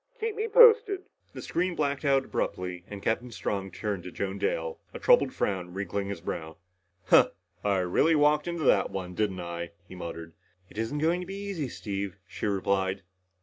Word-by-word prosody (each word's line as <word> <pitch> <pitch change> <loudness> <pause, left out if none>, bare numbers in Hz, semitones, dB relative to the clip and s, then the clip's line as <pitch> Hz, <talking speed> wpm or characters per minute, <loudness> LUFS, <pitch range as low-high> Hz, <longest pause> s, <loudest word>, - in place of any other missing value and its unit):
Keep 445 -1 -2
me 440 +1 -1
posted." 450 -4 +6 0.3
The - - -7
screen 180 0 -1
blacked 140 -2 -1
out 135 -2 +3
abruptly 90 -1 -3
and 100 -1 -8
Captain 120 +2 0
Strong 100 -3 -3
turned 100 0 -3
to 90 - -8
Joan 100 +2 -3
Dale, 485 -1 -1 0.2
a - - -2
troubled - - +4
frown 90 - -2
wrinkling 100 0 -2
his 100 -4 -5
brow. 80 -2 -5 0.5
"Huh. - - +7 0.3
I 100 -1 +2
really 120 - +3
walked 150 +1 +3
into 170 -2 -2
that - - +4
one, 90 -2 -5
didn't 95 -2 -1
I?" 85 0 -5
he - - -11
muttered. 85 -2 -7 0.4
"It 105 - -7
isn't 115 +6 -2
going 165 +4 +1
to 180 - -7
be 195 - -6
easy, 195 -9 -4
Steve," 100 -4 -4
she 95 +3 -4
replied. 95 -1 0
105 Hz, 185 wpm, -28 LUFS, -, 0.5 s, Huh